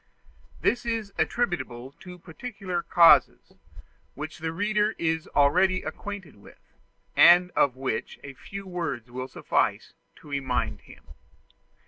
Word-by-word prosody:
This 245 - +1
is 225 -4 -3
attributable 135 - -2
to 180 -1 -11
peculiar 185 +1 -6
causes, 170 -1 +4 0.6
which 155 +3 -7
the 160 0 -3
reader 210 +4 0
is 160 -1 -1
already 185 +6 +3
acquainted 190 - -7
with, 100 - -19 0.4
and 180 +1 +7
of 135 -6 +2
which 130 -4 -4
a 140 - -9
few 195 +8 -9
words 170 -10 -5
will 130 +1 -5
suffice - - -1 0.2
to - - -17
remind 135 -3 -2
him. - - -16
170 Hz, 120 wpm, -26 LUFS, 140-195 Hz, 0.6 s, and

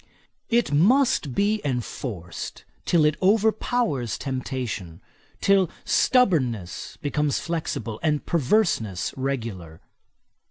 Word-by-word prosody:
It 235 -5 +2
must 195 - +3
be 210 +1 +1
enforced 120 - -5 0.2
till 165 -3 +3
it 150 0 +2
overpowers 215 - +1
temptation; 125 - -4 0.4
till 195 -3 +4 0.2
stubbornness 130 - +1
becomes 145 0 0
flexible, 160 -9 -3
and 150 -2 0
perverseness 145 - +1
regular. 115 -12 -4
145 Hz, 85 wpm, -24 LUFS, 115-195 Hz, 0.4 s, till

